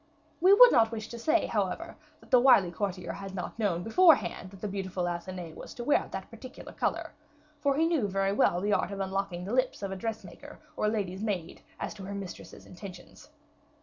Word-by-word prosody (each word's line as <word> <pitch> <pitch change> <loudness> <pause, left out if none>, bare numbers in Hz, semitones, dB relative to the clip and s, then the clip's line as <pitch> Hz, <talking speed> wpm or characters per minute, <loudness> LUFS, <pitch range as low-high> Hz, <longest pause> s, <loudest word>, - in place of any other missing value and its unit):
We 370 +3 +6
would 485 +5 +9
not 225 -2 +4
wish 220 -1 -5
to 235 - -7
say, 310 - +2
however, - - -2 0.3
that - - -20
the 250 - +7
wily 240 -9 +5
courtier 180 -1 -3
had 195 -1 -8
not 180 +4 -6
know 200 -6 +1
beforehand 220 - +3
that 195 0 -14
the 210 - -3
beautiful 190 -2 -3
Athenais 175 -1 -5
was - - -10
to 240 - -5
wear 290 - +2
that 190 0 -7
particular 255 +3 -10
color; - - -2 0.5
for 280 -1 +2
he 325 +2 +3
very 195 -2 0
well 175 -3 +3
knew 205 - -1
the - - +3
art - - +1
of 200 -1 -6
unlocking 190 -2 -3
the 205 - -4
lips 255 -4 0
of 195 - -3
a - - -3
dress 220 +3 -4
maker - - -12 0.2
or - - -1
a - - +3
lady's 200 -3 -3
maid 200 -6 -3 0.2
as - - -4
to 205 -2 -10
her 200 +1 -5
mistress's 195 -2 -8
intentions. 185 0 -12
200 Hz, 215 wpm, -29 LUFS, 185-230 Hz, 0.5 s, would